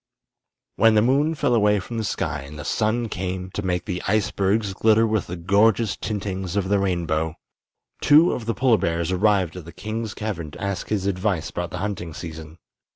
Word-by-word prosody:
When 115 -1 +5
the 105 - +5
moon 145 +6 +2
fell 125 - +1
away 105 -2 +3
from 115 +5 -5
the - - -1
sky 80 -6 -2
and 70 +2 -10
the 75 - -7
sun 115 +4 0
came 95 -1 -4
to 105 - -3
make 90 -2 -1
the 90 0 -3
icebergs 100 0 +1
glitter 110 +3 +4
with 110 -3 0
the 90 - -5
gorgeous 100 +5 +2
tintings 95 -4 -4
of 95 -2 0
the 100 -1 +3
rainbow, 85 -4 -1 0.7
two 155 +4 +6
of 115 -2 -4
the 115 - 0
polar 125 -4 +3
bears 85 +1 -1
arrived 95 -3 +2
at 90 - -8
the 85 - -9
king's 110 +4 -5
cavern 95 -8 -4
to - - -12
ask 100 -1 -3
his 100 -3 -1
advice 95 -3 -1
about 90 0 -3
the 90 - -6
hunting 90 -6 -5
season. 80 -1 -8
100 Hz, 195 wpm, -23 LUFS, 90-110 Hz, 0.7 s, two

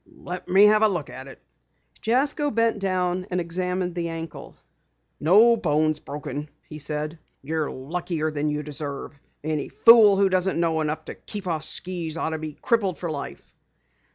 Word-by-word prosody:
"Let 180 +1 -7
me 190 +2 +6
have 215 0 +5
a 220 - +6
look 175 -8 -3
at 130 +1 -9
it." 135 - -12 0.6
Jasko 280 +5 +2
bent 230 -2 +1
down 185 -1 -1
and 180 - -1
examined 180 +1 -2
the 170 -1 -3
ankle. 165 -1 -7 0.6
"No 215 +9 +6
bones 155 -5 +1
broken," 145 +1 -6 0.2
he 155 - -9
said. 150 +2 -4 0.2
"You're 155 +1 -2
luckier 155 +3 -3
than 150 0 -1
you 150 0 -2
deserve. 145 -1 -5 0.3
Any 155 -2 -2
fool 210 - +7
who 200 0 +4
doesn't 185 -1 +1
know 165 -2 +1
enough 155 0 -3
to - - -6
keep 205 -2 -8
off 160 -3 -2
skis 170 -2 -4
ought 160 - -1
to 160 - -3
be 155 -1 -7
crippled 200 -8 +1
for 170 0 -4
life!" 140 -2 -7
170 Hz, 170 wpm, -24 LUFS, 150-190 Hz, 0.6 s, fool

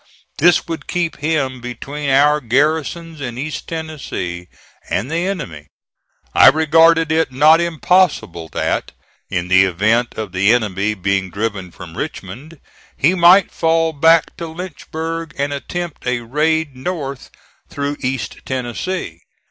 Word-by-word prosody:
This 175 +2 +4
would 165 -1 -5
keep 175 -2 -2
him 140 -5 -1
between 140 +4 -5
our 145 +2 +4
garrisons 155 +5 0
in 120 -3 -5
East 150 +3 -5
Tennessee 145 - -5 0.4
and 125 +9 -2
the 170 +3 0
enemy. 85 - -5 0.7
I - - +7
regarded 160 +2 +5
it 160 -3 +1
not 155 +5 +5
impossible 170 - +1
that - - -2 0.4
in 85 -1 -2
the 95 +1 +5
event 105 +6 +1
of 110 -4 -4
the 95 +4 +3
enemy 105 -2 0
being 95 0 -1
driven 100 -2 -3
from 85 -1 -11
Richmond, 150 +5 -7 0.4
he 160 +6 +3
might 185 +2 +6
fall 165 0 +1
back 160 +2 +3
to 170 - -5
Lynchburg 165 -1 -6
and 140 +1 -1
attempt 170 +1 -5
a 125 -1 0
raid 150 +4 0
north 140 -2 -5 0.4
through 145 0 -3
East 125 -5 -3
Tennessee. 125 - -4
145 Hz, 130 wpm, -18 LUFS, 115-165 Hz, 0.7 s, I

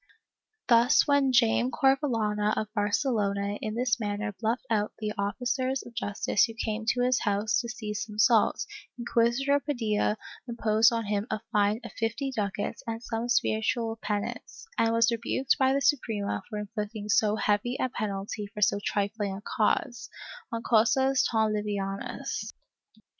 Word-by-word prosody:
Thus 240 +4 +5
when 285 -2 +3
Jayme 115 - +3
Corvehana 225 - +1
of 215 0 -3
Barcelona 205 -2 0
in 215 0 -3
this 245 -1 +1
manner 205 0 -3
bluffed 230 +2 -1
off 210 -2 +1
the 210 -1 -3
officers 255 +6 -1
of 240 - -12
justice 205 -3 +1
who 225 -2 -9
came 220 -1 -3
to 245 +1 +2
his 250 0 +2
house 205 +1 +1
to 235 - -7
seize 215 -2 -4
some 215 -1 -10
salt, 220 +1 +3 0.3
Inc|uisitor 240 +4 +2
Paclilla 220 -6 0 0.3
imposed 225 -1 +3
on 230 -1 -1
him 205 +1 -1
a 215 -1 -2
fine 210 +2 +2
of 235 - -8
fifty 230 +4 -2
ducats 205 -2 -3
and 225 +1 -4
some 230 +1 -3
spiritual 225 0 0
penance, 205 -1 -4
and 225 - +2
was 230 0 +3
rebuked 240 +3 0
by 265 -1 +4
the 275 +1 +1
Suprema 230 -8 0
for 215 - -5
inflicting 210 0 -5
so 210 0 +3
heavy 215 +4 0
a - - +1
penalty 210 -2 -4
for 210 +1 -9
so 200 - +3
trifling 205 -1 -1
a - - -10
cause 220 +2 -1 0.2
— - - -15
''en 230 0 -3
causas 260 +4 +3
tan 220 -2 +1
livianas.'' 200 -2 -3
220 Hz, 155 wpm, -28 LUFS, 210-240 Hz, 0.3 s, Thus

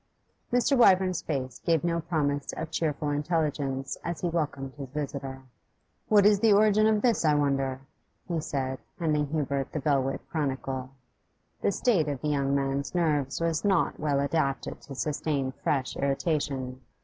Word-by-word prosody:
Mr. 245 +3 +3
Wyvern's 190 -6 +4
face 130 -5 -3
gave 165 -3 +1
no 170 -1 +1
promise 145 -4 -1
of 160 0 -5
cheerful 150 -2 -1
intelligence 145 -3 -1
as 170 -1 -4
he 175 - 0
welcomed 145 -5 -2
his 140 -3 -8
visitor. 135 -2 -5 0.6
'What 205 -2 +5
is 205 -1 +6
the 220 0 +5
origin 215 +1 +5
of 215 -1 +2
this, 235 -7 +3
I 150 -2 +4
wonder?' 135 -2 0 0.5
he 170 -3 -1
said, 130 -3 -3 0.2
handing 150 -3 +1
Hubert 140 -2 -2
the 155 - -1
'Belwick 135 -2 0
Chronicle.' 135 -4 -2 0.7
The - - +2
state 195 -9 +2
of 140 -3 -2
the 150 - -1
young 140 -1 +1
man's 140 +2 -1
nerves 150 -6 +1
was 165 -1 0
not 195 -4 +2
well 145 -2 +1
adapted 140 -1 -1
to 135 - -9
sustain 145 -1 -1
fresh 135 0 -1
irritation. 135 -3 -1
145 Hz, 155 wpm, -28 LUFS, 135-170 Hz, 0.7 s, is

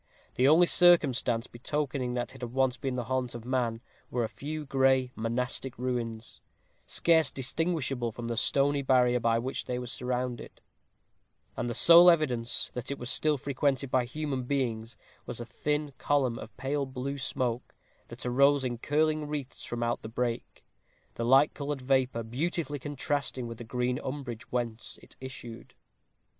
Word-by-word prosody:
The 130 - +3
only 160 +4 +7
circumstance 140 -10 +4
betokening 130 0 -3
that 120 +1 -3
it 135 - -13
had 120 -1 -5
once 130 -1 +2
been 130 -1 -3
the 125 - -2
haunt 125 0 -2
of 120 -1 -8
man 120 -3 -1 0.3
were 120 -1 -1
a - - 0
few 155 +1 -6
gray 130 -2 +2
monastic 125 +3 -2
ruins, 120 -2 -4 0.5
scarce 160 -4 +3
distinguishable 135 -3 -2
from 115 +1 -6
the 115 - -2
stony 140 +4 +2
barrier 125 -2 +3
by 115 -1 +2
which 130 +3 -3
they 125 - -2
were 125 - -4
surrounded; 125 0 -3 1.0
and 120 - -2
the 120 - -3
sole 170 +1 +9
evidence 130 -8 +1
that 125 +1 -4
it 140 - -3
was 125 - -2
still 155 -1 +2
frequented 140 0 -1
by 130 -2 +2
human 135 -1 -3
beings 115 -4 -2 0.3
was 120 - -5
a 120 - -5
thin 150 +7 -2
column 135 -5 +1
of 110 -1 -10
pale 135 +1 -1
blue 135 +2 -4
smoke, 125 -2 -2 0.3
that 120 +2 -8
arose 140 +3 +4
in 120 -2 -3
curling 155 +2 +1
wreaths 145 -3 -5
from 120 0 -3
out 120 0 -1
the 110 - -7
brake, 120 0 -3 0.5
the 115 - -4
light 135 +5 +5
colored 140 -2 -4
vapor 130 -3 +1
beautifully 145 +4 -2
contrasting 140 -2 -2
with 115 -1 -7
the - - -6
green 125 +2 -1
umbrage 130 -5 -6
whence 120 -2 -3
it - - -16
issued. 125 -3 -9
130 Hz, 165 wpm, -29 LUFS, 120-140 Hz, 1.0 s, sole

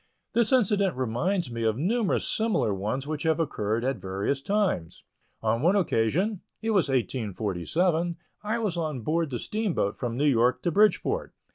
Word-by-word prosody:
This 235 0 +3
incident 205 - +2
reminds 130 - -1
me 115 0 -4
of 110 -1 +1
numerous 205 - +1
similar 220 - +1
ones 105 +8 -2
which 150 0 -4
have 160 0 +1
occurred 110 -7 -1
at 135 +1 0
various 100 +9 -2
times. 195 - -1 0.4
On 115 +2 +1
one 175 +6 +4
occasion 180 - +1 0.2
it 225 0 -1
was 190 -8 +2
in 135 - +2
1847 130 - -1 0.2
I 215 +2 -1
was 210 -7 -1
on 155 -6 -2
board 160 +5 0
the 125 - -3
steamboat 195 - -1
from 120 -2 -3
New 145 - +1
York 125 -2 +3
to 175 - +1
Bridgeport. 210 +5 +2
155 Hz, 165 wpm, -27 LUFS, -, 0.4 s, one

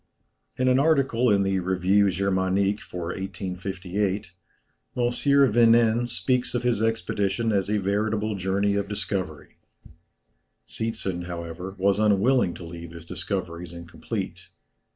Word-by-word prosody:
In 130 - +1
an 130 +1 +4
article 135 -5 +3
in 100 -1 +4
the 95 0 +1
Revùe 95 +2 +2
Germanique 95 +2 +1
for 85 -2 -6
1858, 95 0 -3 0.7
M. 125 - +1
Vinen 120 -3 +4
speaks 125 -1 0
of 120 - -1
his 120 -3 +1
expedition 110 0 0
as 100 -1 0
a 105 - +2
veritable 105 +2 0
journey 100 +1 0
of 100 0 -1
discovery. 95 -7 -4 1.1
Seetzen, 95 -6 -3
however, 85 +2 -6
was 100 +1 +2
unwilling 105 0 +3
to 85 - -9
leave 85 0 -8
his 85 -1 -10
discoveries 85 -2 -4
incomplete. 85 0 -6
100 Hz, 120 wpm, -25 LUFS, 95-115 Hz, 1.1 s, an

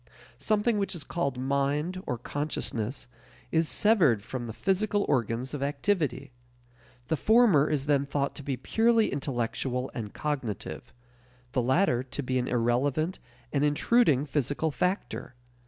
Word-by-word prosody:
Something 215 0 +1
which 195 -1 -1
is 160 - -6
called 140 -7 -2
mind 140 +7 -1
or 125 - -1
consciousness 125 -3 -3 0.4
is 160 -1 +2
severed 165 - +3
from 120 +1 -5
the - - -5
physical 200 - 0
organs 125 0 0
of 145 - -4
activity. 140 -2 -1 0.8
The 160 - +2
former 210 - +4
is 145 -3 0
then 140 -2 +2
thought 140 0 -1
to 145 - -8
be 135 -2 -2
purely 225 - +2
intellectual 125 -1 -2
and 110 -4 -5
cognitive; 135 -9 -4 0.6
the 130 -2 +1
latter 130 +1 +2
to 135 +2 -5
be 130 0 0
an 125 - -2
irrelevant 130 +8 0 0.3
and 140 -1 +2
intruding 150 - +3
physical 145 +2 -1
factor. 180 -4 -2
140 Hz, 140 wpm, -28 LUFS, 130-170 Hz, 0.8 s, former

